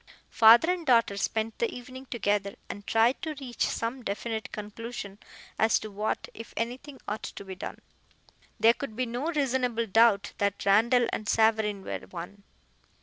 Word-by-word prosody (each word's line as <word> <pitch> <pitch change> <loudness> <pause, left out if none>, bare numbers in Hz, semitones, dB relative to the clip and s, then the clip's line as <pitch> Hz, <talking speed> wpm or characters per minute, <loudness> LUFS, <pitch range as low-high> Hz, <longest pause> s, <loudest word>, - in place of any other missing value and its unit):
Father 235 +9 +7
and 355 -2 -5
daughter 230 -7 +3
spent 220 +2 -2
the 470 - +1
evening 255 +2 -9
together, 205 -4 -1
and 205 - -8
tried 230 +3 +3
to 315 -1 -4
reach 250 -3 -3
some 235 +3 -2
definite 220 +2 -4
conclusion 210 -1 -7 0.4
as 220 0 +4
to 215 - -7
what, 210 +2 -2
if 230 - -10
anything, 255 +4 -4
ought 210 +1 -3
to 200 - -8
be 190 - -6
done. 185 - -7 0.8
There 225 +2 +6
could 245 -4 -7
be 255 +2 0
no 245 +5 -3
reasonable 260 -7 0
doubt 220 -1 +4
that 200 -1 -1
Randall 235 +5 +4
and 215 - -3
Savareen 220 -3 +2
were - - -5
one. 185 +3 -8
225 Hz, 160 wpm, -28 LUFS, 205-245 Hz, 0.8 s, Father